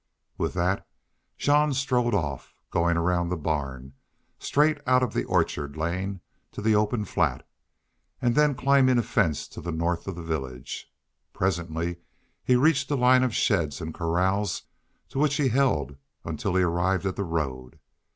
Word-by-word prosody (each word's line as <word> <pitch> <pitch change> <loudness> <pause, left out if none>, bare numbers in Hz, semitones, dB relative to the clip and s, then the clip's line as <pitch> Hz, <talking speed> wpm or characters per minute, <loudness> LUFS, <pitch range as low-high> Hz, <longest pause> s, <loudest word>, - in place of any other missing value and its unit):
With - - -2
that 90 +2 0 0.5
Jean 150 0 +3
strode 125 -4 +1
off, 70 -8 -3 0.2
going 85 0 +2
around 85 0 +1
the 90 - -1
barn, 70 -4 -3 0.5
straight 150 +2 +2
out 125 -2 +3
the - - -1
orchard 70 +1 -1
lane 90 +4 -2 0.3
to - - -7
the 110 +1 +2
open 105 +1 +1
flat, - - -1 0.7
and 120 -1 +2
then 150 0 +3
climbing 130 -1 +4
a 120 - +2
fence 85 -11 0
to - - -9
the 85 - -4
north 85 +2 -1
of 95 - -4
the 85 - -7
village. 65 -6 -5 0.4
Presently 85 -2 -1 0.5
he 125 - +3
reached 140 +1 +3
a 145 - +1
line 125 0 +5
of 125 -3 0
sheds 80 -8 +1
and 80 0 -5
corrals, 90 +4 0 0.5
to 135 - -4
which 145 -1 +2
he 140 -2 +2
held 75 - +1 0.3
until 90 - -2
he 95 - +4
arrived 90 +2 +1
at 95 - -1
the 100 - -2
road. 70 -8 -3
90 Hz, 160 wpm, -26 LUFS, 80-125 Hz, 0.7 s, line